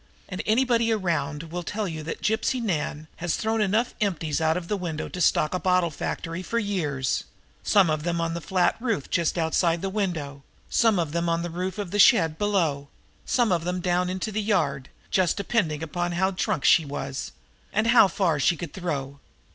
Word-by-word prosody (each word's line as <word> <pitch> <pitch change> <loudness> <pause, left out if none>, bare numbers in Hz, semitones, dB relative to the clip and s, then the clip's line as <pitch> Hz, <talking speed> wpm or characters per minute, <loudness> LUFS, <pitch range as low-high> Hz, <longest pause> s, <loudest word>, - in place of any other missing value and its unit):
And 185 0 -4
anybody 235 0 +3
around 165 -8 -1
here 165 - -12
will 175 +1 -3
tell 205 +4 -3
you 160 -3 -5
that 155 - -6
Gypsy 220 +4 +1
Nan 155 -7 -2
has 175 -1 -1
thrown 220 0 0
enough 215 +4 +1
empties 165 -6 -1
out 160 +1 +2
of 175 -2 -5
the 210 - 0
window 170 -5 -4
there - - -6
to 180 - -5
stock 155 -1 +3
a 185 - 0
bottle 180 -2 +2
factory 165 +3 -4
for 210 +6 -3
years, 160 - -1 0.4
some 195 -3 +4
of 155 -1 0
them 170 +1 -1
on 165 0 -1
the 170 - -4
flat 180 +2 +1
roof 230 - -2
just 170 +1 +1
outside 165 +1 +1
the 195 - -2
window, 160 -9 -3 0.3
some 225 -4 +3
of 165 -4 -1
them 170 +1 -1
on 165 0 0
the 175 - -4
roof 185 +4 -3
of 200 -4 -4
the 205 - -1
shed 165 -7 +5
below, 190 -8 +1
and 140 - -16 0.4
some 240 -5 +2
of 170 -2 +1
them 180 +1 -2
down 180 0 0
into 185 +4 -3
the 215 +1 -1
yard, 140 -10 0 0.2
just 185 -2 +2
depending 185 -7 0
on 175 0 -1
how 190 +2 +1
drunk 185 -6 -1
she 165 - +6
was 140 -2 -5 0.4
and 215 +2 +1
how 230 -3 +7
far 185 -5 0
she 170 +4 +2
could 165 -1 -7
throw. 140 -6 -4
175 Hz, 210 wpm, -25 LUFS, 160-200 Hz, 0.4 s, how